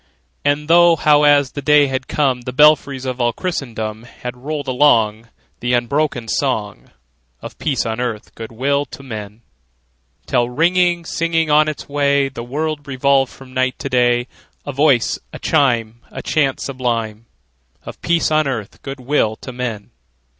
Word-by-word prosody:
And 145 +1 0
thought 170 -1 +5
how, 150 -1 +5
as 145 -2 +4
the 145 - -6
day 150 +1 +5
had 130 -1 -3
come, 135 -4 0
The 125 +1 -5
belfries 140 -1 +4
of 130 -1 -3
all 120 0 +2
Christendom 115 - -4
Had 125 +1 -8
rolled 145 +3 -5
along 115 -5 +2 0.3
The 120 +1 -1
unbroken 120 0 0
song 110 -6 -2 0.5
Of - - -10
peace 140 -5 -1
on 110 +1 -3
earth, 115 -4 -4
good 115 0 -8
will 140 +5 0
to 140 - -11
men! 110 -3 -8 0.8
Till, 120 0 +1
ringing, 175 +4 +2
singing 165 -2 0
on 150 +1 +5
its 155 - -5
way, 140 -1 +1
The 125 - -8
world 145 +4 -3
revolved 135 0 +2
from 130 -1 -14
night 130 0 0
to - - -5
day, 120 -1 +2 0.4
A 145 - -4
voice, 140 -4 +2
a - - -8
chime, 120 -4 +1
A - - -8
chant 140 -4 +1
sublime 115 -4 -3 0.6
Of - - -10
peace 170 -1 +1
on 155 -1 +2
earth, 110 -7 -5
good 135 0 -7
will 125 -5 +1
to 130 - -9
men! 120 -4 -5
135 Hz, 160 wpm, -18 LUFS, 120-145 Hz, 0.8 s, thought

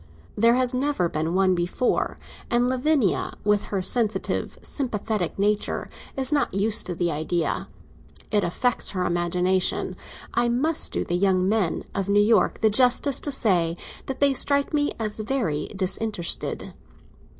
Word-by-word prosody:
There 230 +3 +4
has 255 -1 +1
never 265 -7 0
been 160 +3 -2
one 190 -1 +3
before, 180 +8 -1 0.3
and 240 +1 +2
Lavinia, 260 - 0
with 210 0 +1
her 195 -2 -3
sensitive, 215 -3 0
sympathetic 215 - -3
nature, 205 +1 -1 0.3
is 265 0 +1
not 285 -10 0
used 205 +2 +3
to 180 - -4
the 175 0 0
idea. 160 +3 -2 0.6
It 205 -2 +2
affects 245 +8 0
her 180 - 0
imagination. 180 +2 0 0.4
I 240 0 +1
must 290 +7 0
do - - -1
the - - -4
young 185 0 +2
men 200 -5 0
of 195 0 -3
New 205 +1 +4
York 215 +2 +2
the 220 - +4
justice 255 +4 +3
to 290 - -2
say 180 -10 +2 0.3
that 270 - -5
they 280 -1 +4
strike 280 +2 +1
me 290 -1 +1
as 215 -1 -4
very 215 - -2
disinterested. 190 -1 0
210 Hz, 150 wpm, -24 LUFS, 180-250 Hz, 0.6 s, There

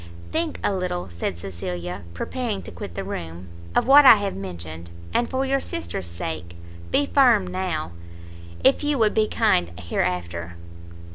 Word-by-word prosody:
"Think 320 -1 -1
a - - +2
little," 180 - -3
said 85 0 -3
Cecilia, 90 0 -5
preparing 230 - -3
to - - -9
quit 85 0 -8
the - - -3
room, 85 +2 -6 0.3
"of - - +3
what 280 +3 +9
I 260 - +10
have 200 -2 -2
mentioned, 85 -3 -7 0.2
and, 240 - +1
for 265 0 0
your 275 0 +2
sister's 85 - -4
sake, 85 0 -5 0.3
be 285 - +3
firm 245 -9 +5
now, 180 - -3 0.7
if 270 +2 +4
you 295 -1 +1
would 220 -3 +3
be 215 -1 +3
kind 85 - +2
hereafter." 85 -1 -2
95 Hz, 155 wpm, -24 LUFS, -, 0.7 s, I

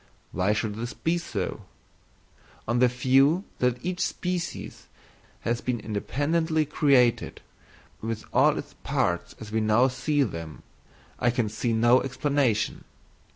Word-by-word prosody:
Why 95 +3 +1
should 105 -1 -1
this 120 +4 -5
be 170 +2 0
so? 100 - -4 1.1
On 120 +2 +1
the 125 - +6
view 135 +8 +3 0.2
that 125 -1 +2
each 180 0 -2
species 180 -1 -3 0.5
has 120 +1 -1
been 125 -2 -1
independently 155 +9 0
created, 135 -5 +2 0.6
with 110 0 -4
all - - +4
its - - -7
parts - - -1
as 105 -1 -9
we 110 0 +1
now 110 +5 +4
see 140 +3 +1
them, 80 - -6 0.6
I 120 - +3
can 120 -3 0
see 110 +3 -2
no 120 +3 +4
explanation. 135 -4 0
125 Hz, 130 wpm, -26 LUFS, 110-145 Hz, 1.1 s, the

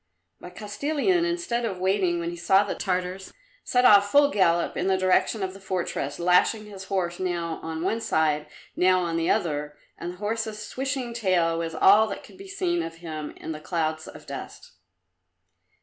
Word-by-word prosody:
But 180 0 -11
Kostilin, 295 - 0
instead 345 -9 -1
of 205 -5 -2
waiting 185 -2 +1
when 170 0 -3
he - - -6
saw 190 +3 +3
the 205 - -3
Tartars, 185 0 -3 0.3
set 250 0 +2
off 205 -3 +7
full 285 +2 +5
gallop 170 -5 +2
in 180 - -1
the 190 -1 +3
direction 185 +2 +2
of 185 0 -3
the 195 - -12
fortress, 180 -7 -3
lashing 180 +5 +3
his 195 -2 -9
horse 185 -3 -2
now 170 -3 -2
on 160 0 -5
one 215 +5 0
side, 155 -8 +1 0.3
now 185 0 +3
on 170 -2 -2
the 165 0 0
other, 150 -2 -1 0.2
and 175 +1 -5
the - - -14
horse's 220 +1 -3
switching 260 +1 -4
tail 185 -7 +1
was 165 -1 -4
all 210 +6 +6
that 200 - -6
could 370 - -16
be 390 - -10
seen 365 -3 -1
of 165 - -6
him 155 -3 -7
in - - -6
the 155 - -5
clouds 160 -1 -2
of - - -12
dust. - - -8
185 Hz, 185 wpm, -25 LUFS, 170-220 Hz, 0.3 s, off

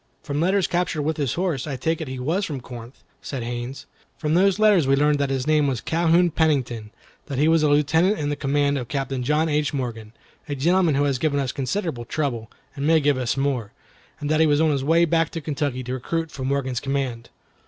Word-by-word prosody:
"From 145 +1 -2
letters 190 +2 +2
captured 175 -3 -1
with 155 +1 -1
his 140 -6 -1
horse, 170 -7 -1
I 140 - -3
take 160 +5 -1
it 160 - -4
he 130 0 -5
was 160 +11 -1
from 145 -7 -3
Corinth," 120 0 -11 0.2
said 130 -4 -5
Haines. 120 +3 -5 0.3
"From 155 -1 -1
those 190 +3 +4
letters 210 -9 +4
we 135 - +4
learned 145 +1 +2
that 140 -1 0
his 135 -1 -1
name 155 -2 +3
was 130 -4 -1
Calhoun 170 +3 +2
Pennington, 130 -9 0 0.4
that 140 -3 -4
he 150 +3 +3
was 165 0 +4
a 150 - +3
lieutenant 160 +7 +3
in 145 -1 -2
the 145 - -1
command 140 0 +1
of 125 - -6
Captain 135 -1 -3
John 150 +5 +1
H. 150 -1 0
Morgan, 115 -4 -5 0.4
a 145 - -2
gentleman 170 +2 +2
who 140 - +2
has 140 -3 0
given 145 0 +1
us 135 -2 -1
considerable 135 - -3
trouble, 120 -5 -3 0.3
and 140 +1 -2
may 160 0 +5
give 145 -1 +2
us 125 +1 -1
more, 130 -6 -1 0.5
and 145 - -4
that 155 - +2
he 160 - +5
was 145 -1 +3
on 160 -1 +3
his 140 -2 -1
way 165 +4 +4
back 165 -1 +1
to 165 - -5
Kentucky 145 -4 -3
to 125 +1 -4
recruit 165 +6 -3
for 130 - -6
Morgan's 130 -2 -1
command." 135 -4 -3
145 Hz, 225 wpm, -23 LUFS, 130-160 Hz, 0.5 s, may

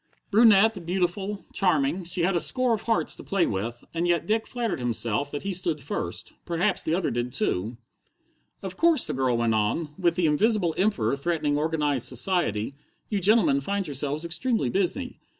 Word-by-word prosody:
Brunette, 215 -2 +5
beautiful, 190 +3 -2
charming, 170 -1 +1
she 175 +1 -1
had 180 +2 +1
a - - +3
score 255 +5 +2
of 215 - -2
hearts 230 - 0
to - - -11
play 195 -4 +1
with, 115 +5 -4
and 170 +1 -1
yet 175 -1 +1
Dick 220 +1 0
flattered 235 - -3
himself 120 +2 -1
that 145 - -5
he 195 0 -2
stood 170 -4 0
first. 140 - -5
Perhaps 180 +4 0
the 160 - 0
others 190 - -1
did 120 +1 -2
too. 115 - -2 0.9
"Of 190 -1 -6
course," 335 -2 +3
the - - -3
girl 130 -2 +1
went 115 -1 +1
on, 110 +9 0
"with 170 -2 +2
the 180 -2 +1
Invisible 180 +3 +2
Emperor 140 - +1
threatening 150 0 -1
organized 150 -4 0
society, 125 - -1 0.4
you 205 - 0
gentlemen 190 -8 +4
find 200 +6 -2
yourselves 145 +1 -1
extremely 175 - 0
busy. 200 +8 -1
170 Hz, 175 wpm, -26 LUFS, 140-200 Hz, 0.9 s, Brunette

